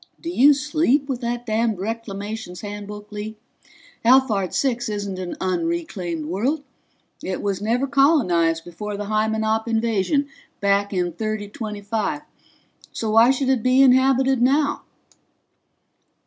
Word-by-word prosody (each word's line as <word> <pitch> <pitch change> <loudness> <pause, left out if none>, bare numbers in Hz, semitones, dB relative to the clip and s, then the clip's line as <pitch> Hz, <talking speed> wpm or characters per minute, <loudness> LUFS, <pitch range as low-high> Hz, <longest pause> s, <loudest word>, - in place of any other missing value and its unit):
"Do 335 - -5
you 285 -2 +6
sleep 290 -1 +1
with 260 -3 -3
that 240 0 -3
damned 225 -1 0
Reclamations 205 -2 -5
Handbook, 205 0 -8
Lee? 210 +1 -6 0.7
Alphard 230 -6 +3
Six 240 -4 0
isn't 200 -3 -4
an 180 -1 -5
unreclaimed 190 - -2
world 245 - -1 0.6
it 185 -1 -3
was 200 -1 -1
never 235 +5 +1
colonized 180 - +2
before 205 +4 -6
the 205 - -4
Hymenop 220 +1 0
invasion 230 +5 +1 0.3
back 200 0 +1
in 180 -3 -1
3025, 215 - -3 0.7
so 220 -1 -3
why 225 +3 +6
should 265 0 +1
it 260 -4 +2
be 255 +2 +4
inhabited 265 0 +4
now?" 280 +4 +2
220 Hz, 120 wpm, -22 LUFS, 200-265 Hz, 0.7 s, you